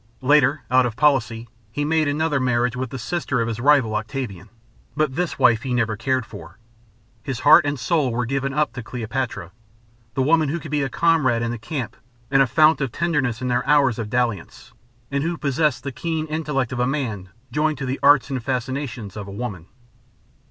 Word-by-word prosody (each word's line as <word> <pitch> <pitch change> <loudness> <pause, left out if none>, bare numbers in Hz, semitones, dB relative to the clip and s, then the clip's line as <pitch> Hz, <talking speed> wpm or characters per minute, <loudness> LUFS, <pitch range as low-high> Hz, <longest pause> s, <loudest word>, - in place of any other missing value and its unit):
Later, 145 +1 +3
out 130 -1 +4
of 115 - -6
policy, 120 -6 +1 0.2
he 145 +6 -2
made 155 0 +1
another 150 0 0
marriage 125 -1 +1
with 130 0 -3
the 135 - -6
sister 130 0 -2
of 115 - 0
his 115 -1 -4
rival, 130 -5 +3
Octavian, 110 -4 -5 0.5
but 155 -3 +1
this 175 +1 -2
wife 120 -3 +4
he 125 0 -2
never 115 -3 0
cared 130 +2 -1
for. 100 -4 -12 0.6
His 125 0 -5
heart 150 +1 +7
and 145 -2 -2
soul 140 0 +1
were 120 +1 -1
given 135 +2 -2
up 150 +1 0
to 125 - -6
Cleopatra, 115 -5 -4 0.6
the 130 - +1
woman 155 +1 +3
who 170 +4 -2
could 140 - -9
be 150 -1 +1
a 135 - -1
comrade 135 -6 +2
in 115 - -1
the 120 - -5
camp 135 -1 -5 0.4
and 135 -1 +5
a 135 - +4
fount 155 +4 +4
of 135 -4 -1
tenderness 135 -8 -1
in - - -1
their 125 0 +1
hours 140 -5 +3
of 110 -2 -4
dalliance, 115 -6 -3 0.4
and 140 0 0
who 170 +1 -2
possessed 140 -2 0
the 140 - -4
keen 160 +4 -3
intellect 150 -5 -2
of 125 - -4
a 125 - +2
man 115 -9 -3 0.2
joined 150 +3 0
to 135 - -4
the 130 +1 -3
arts 140 -2 +5
and 130 -3 -3
fascinations 125 -4 -4
of 105 -2 -6
a - - -8
woman. 100 -5 -6
130 Hz, 200 wpm, -22 LUFS, 115-150 Hz, 0.6 s, heart